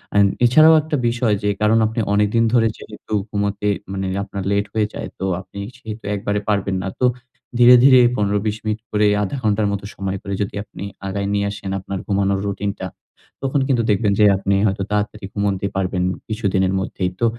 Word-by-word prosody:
আন 100 Hz, 0 st, +6 dB, 0.2 s
এছাড়াও 155 Hz, +7 st, +7 dB
একটা 155 Hz, -1 st, -2 dB
বিষয় 120 Hz, -3 st, +1 dB
যে 105 Hz, -, +1 dB
কারণ 105 Hz, +1 st, +4 dB
আপনি 115 Hz, +2 st, -4 dB
অনেকদিন 105 Hz, +3 st, +2 dB
ধরে 115 Hz, -2 st, +4 dB
যেহেতু 110 Hz, 0 st, -10 dB, 0.2 s
ঘুমোতে 100 Hz, 0 st, -2 dB, 0.2 s
মানে 95 Hz, -1 st, -3 dB, 0.2 s
আপনার 100 Hz, -1 st, -6 dB
লেট 100 Hz, 0 st, +1 dB
হয়ে 110 Hz, -1 st, +1 dB
যায় -, -, -6 dB
তো 95 Hz, -, -2 dB, 0.2 s
আপনি 95 Hz, +2 st, -11 dB, 0.2 s
সেহেতু 110 Hz, -2 st, -8 dB
একবারে 100 Hz, +1 st, -1 dB
পারবেন 100 Hz, -2 st, 0 dB
না। 95 Hz, -, -3 dB
তো 125 Hz, -, +3 dB, 0.5 s
ধীরে, 120 Hz, +1 st, +9 dB
ধীরে 130 Hz, -1 st, +8 dB, 0.2 s
১৫, 105 Hz, -1 st, +1 dB
২০ 105 Hz, 0 st, -1 dB
মিনিট 110 Hz, 0 st, -2 dB
করে, 105 Hz, 0 st, +3 dB, 0.2 s
০.৫ 100 Hz, -, -3 dB
ঘন্টার 105 Hz, 0 st, +1 dB
মতো 100 Hz, 0 st, -4 dB
সময় 95 Hz, 0 st, -3 dB
করে 100 Hz, -, -4 dB
যদি -, -, -6 dB
আপনি 100 Hz, -3 st, -10 dB, 0.2 s
আগায় 100 Hz, +1 st, -2 dB
নিয়ে 100 Hz, 0 st, +1 dB
আসেন 100 Hz, -1 st, -6 dB
আপনার 95 Hz, 0 st, -5 dB
ঘুমানোর 100 Hz, -1 st, +1 dB
রুটিনটা 100 Hz, -1 st, -3 dB, 0.6 s
তখন 135 Hz, +2 st, +1 dB
কিন্তু 125 Hz, -4 st, +2 dB
দেখবেন 105 Hz, 0 st, +2 dB
যে 105 Hz, -, +6 dB
আপনি 100 Hz, +1 st, -1 dB
হয়তো 95 Hz, 0 st, -1 dB
তাড়াতাড়ি 105 Hz, 0 st, -2 dB
ঘুমোতে 100 Hz, -1 st, 0 dB
পারবেন 95 Hz, -1 st, -1 dB, 0.3 s
কিছুদিনের 95 Hz, -3 st, 0 dB
মধ্যেই। 95 Hz, -1 st, -2 dB
তো 120 Hz, -, +2 dB
100 Hz, 185 wpm, -20 LUFS, 100-110 Hz, 0.6 s, ধীরে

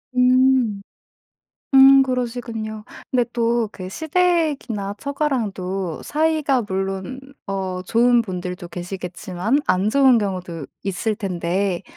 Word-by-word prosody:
음. 250 Hz, -4 st, +3 dB, 0.9 s
음 270 Hz, 0 st, +8 dB
그러시군요. 235 Hz, -4 st, -3 dB, 0.3 s
근데 245 Hz, -2 st, +2 dB
또 235 Hz, -1 st, +1 dB
그 185 Hz, -1 st, -7 dB
시댁이나 310 Hz, -, 0 dB
처가랑도 195 Hz, -, -2 dB
사이가 305 Hz, -4 st, +1 dB
물론 195 Hz, +5 st, -4 dB, 0.3 s
어 190 Hz, -2 st, -3 dB
좋은 240 Hz, +3 st, +3 dB
분들도 180 Hz, -3 st, -6 dB
계시겠지만 180 Hz, -, -3 dB
안 185 Hz, +3 st, +2 dB
좋은 265 Hz, -1 st, +5 dB
경우도 180 Hz, -7 st, -4 dB, 0.2 s
있을 200 Hz, +3 st, -1 dB
텐데 185 Hz, -2 st, -2 dB
215 Hz, 225 characters per minute, -21 LUFS, 185-260 Hz, 0.9 s, 음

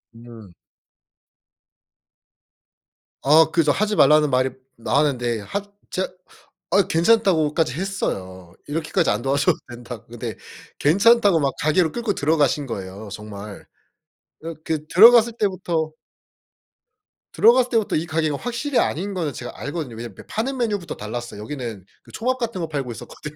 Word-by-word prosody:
음. 115 Hz, -5 st, -13 dB, 2.7 s
아 155 Hz, +3 st, +6 dB
그 165 Hz, -, +3 dB
저 150 Hz, -, +3 dB
하지 210 Hz, +6 st, 0 dB
말라는 150 Hz, -4 st, +5 dB
말이 130 Hz, 0 st, +2 dB, 0.3 s
나왔는데 120 Hz, -3 st, 0 dB
하 200 Hz, -, -4 dB, 0.3 s
제가 185 Hz, -, -2 dB, 0.6 s
아 195 Hz, +1 st, +4 dB
괜찮다고까지 165 Hz, -, +2 dB
했어요. 95 Hz, -, -4 dB
이렇게까지 155 Hz, +2 st, 0 dB
안 105 Hz, +2 st, 0 dB
도와줘도 140 Hz, +2 st, +1 dB
된다고. 120 Hz, -2 st, -9 dB
근데 120 Hz, -1 st, -6 dB, 0.4 s
괜찮다고 200 Hz, +3 st, +4 dB
막 140 Hz, -2 st, 0 dB
가게로 160 Hz, +2 st, +2 dB
끌고 235 Hz, -3 st, -1 dB
들어가신 150 Hz, -2 st, +1 dB
거예요 100 Hz, -1 st, -7 dB
정말. 105 Hz, 0 st, -9 dB, 0.8 s
어 165 Hz, +1 st, -5 dB
그 155 Hz, -2 st, -2 dB
들어갔을 230 Hz, +6 st, +7 dB
때부터 175 Hz, -6 st, -1 dB, 1.4 s
들어갔을 245 Hz, +3 st, +5 dB
때부터 225 Hz, -3 st, +1 dB
이 155 Hz, -, 0 dB
가게가 160 Hz, -3 st, -1 dB
확실히 245 Hz, -, -1 dB
아닌 195 Hz, +6 st, -1 dB
거는 165 Hz, -6 st, -2 dB
제가 120 Hz, -, -7 dB
알거든요. 145 Hz, -6 st, -5 dB
왜냐면 115 Hz, -3 st, -8 dB
이렇게 -, -, -13 dB
파는 260 Hz, +5 st, -2 dB
메뉴부터 205 Hz, -8 st, -2 dB
달랐어요. 115 Hz, 0 st, -6 dB
여기는 115 Hz, -5 st, -6 dB, 0.2 s
그 -, -, -17 dB
초밥 255 Hz, +3 st, -1 dB
같은 230 Hz, -6 st, -3 dB
거 165 Hz, -, -2 dB
팔고 140 Hz, -5 st, -4 dB
있었거든요. 150 Hz, +5 st, -9 dB
155 Hz, 325 characters per minute, -22 LUFS, 120-195 Hz, 2.7 s, 들어갔을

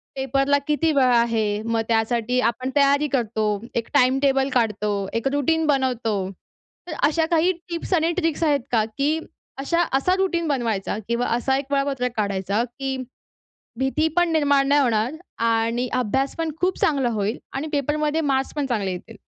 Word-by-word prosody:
पेपरला 275 Hz, +1 st, +1 dB
किती 310 Hz, +2 st, +2 dB
वेळ 260 Hz, -4 st, +3 dB
आहे? 220 Hz, -3 st, +1 dB
मग 230 Hz, 0 st, 0 dB
त्यासाठी 230 Hz, +2 st, +1 dB
आपण 255 Hz, +2 st, -1 dB
तयारी 285 Hz, +1 st, +4 dB
करतो, 235 Hz, -5 st, -1 dB, 0.3 s
एक 230 Hz, -1 st, -1 dB
टाइम 260 Hz, -2 st, +4 dB
टेबल 270 Hz, -1 st, +2 dB
काढतो, 210 Hz, -4 st, 0 dB
एक 230 Hz, +3 st, -1 dB
रूटीन 320 Hz, +3 st, +1 dB
बनवतो. 255 Hz, -6 st, +1 dB, 0.7 s
तर 330 Hz, -, -5 dB
अशा 320 Hz, +2 st, +1 dB
काही 335 Hz, +2 st, +4 dB, 0.2 s
टिप्स 340 Hz, +2 st, -3 dB
आणि 330 Hz, -1 st, +2 dB
ट्रिक्स 330 Hz, -3 st, 0 dB
आहेत 295 Hz, -3 st, +3 dB
का? 225 Hz, -3 st, +3 dB
की 280 Hz, +8 st, -1 dB, 0.4 s
अशा 335 Hz, +5 st, +1 dB, 0.2 s
असा 365 Hz, +7 st, +1 dB
रूटीन 355 Hz, -3 st, 0 dB
बनवायचा 230 Hz, -9 st, -1 dB
किंवा 235 Hz, +1 st, 0 dB
असा 265 Hz, +2 st, +1 dB
एक 275 Hz, -, -3 dB
वेळापत्रक 275 Hz, -3 st, 0 dB
काढायचा, 200 Hz, +1 st, 0 dB
की 265 Hz, +2 st, -4 dB, 0.8 s
भीती 265 Hz, +4 st, +1 dB
पण 350 Hz, 0 st, +4 dB
निर्माण 285 Hz, -3 st, +3 dB
नाही 290 Hz, +1 st, +4 dB
होणार 230 Hz, 0 st, +1 dB, 0.3 s
आणि 230 Hz, +2 st, +1 dB
अभ्यास 260 Hz, +3 st, 0 dB
पण 325 Hz, -1 st, -1 dB
खूप 365 Hz, +1 st, 0 dB
चांगला 275 Hz, -5 st, +2 dB
होईल 215 Hz, +2 st, -1 dB
आणि 275 Hz, +3 st, -3 dB
पेपरमध्ये 300 Hz, +2 st, 0 dB
मार्क्स 270 Hz, -3 st, 0 dB
पण 290 Hz, -, 0 dB
चांगले 215 Hz, -7 st, -1 dB
येतील? 205 Hz, +4 st, -9 dB
265 Hz, 160 wpm, -23 LUFS, 230-295 Hz, 0.8 s, तयारी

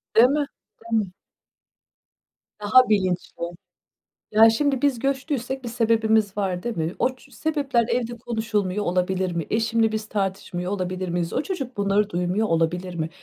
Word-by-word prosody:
Değil 235 Hz, +3 st, +8 dB
mi, 290 Hz, +1 st, +1 dB, 0.4 s
değil 225 Hz, -2 st, 0 dB
mi? 180 Hz, -, -14 dB, 1.5 s
Daha 220 Hz, +4 st, +5 dB
bilinçli. 185 Hz, -4 st, 0 dB, 0.9 s
Ya, 220 Hz, +1 st, +7 dB
şimdi 275 Hz, +2 st, 0 dB
biz 275 Hz, -4 st, +2 dB
göçtüysek 265 Hz, -1 st, -2 dB
bir -, -, -3 dB
sebebimiz 220 Hz, -3 st, +2 dB
var, 185 Hz, -3 st, -1 dB
değil 240 Hz, -5 st, -3 dB
mi? 160 Hz, +2 st, -2 dB
O 255 Hz, 0 st, +1 dB
ç -, -, -20 dB
sebepler 280 Hz, -7 st, 0 dB
evde 240 Hz, 0 st, -1 dB
konuşulmuyor 215 Hz, -4 st, -1 dB
olabilir 180 Hz, +1 st, 0 dB
mi? 165 Hz, -2 st, -3 dB
Eşimle 225 Hz, 0 st, +2 dB
biz 215 Hz, 0 st, -3 dB
tartışmıyor 190 Hz, -2 st, -2 dB
olabilir 185 Hz, -1 st, -3 dB
miyiz? 170 Hz, -1 st, -2 dB
O 265 Hz, -, 0 dB
çocuk 275 Hz, -, -5 dB
bunları 200 Hz, +1 st, +1 dB
duymuyor 180 Hz, +5 st, 0 dB
olabilir 175 Hz, +2 st, 0 dB
mi? 160 Hz, -1 st, -2 dB
215 Hz, 150 wpm, -24 LUFS, 185-240 Hz, 1.5 s, Değil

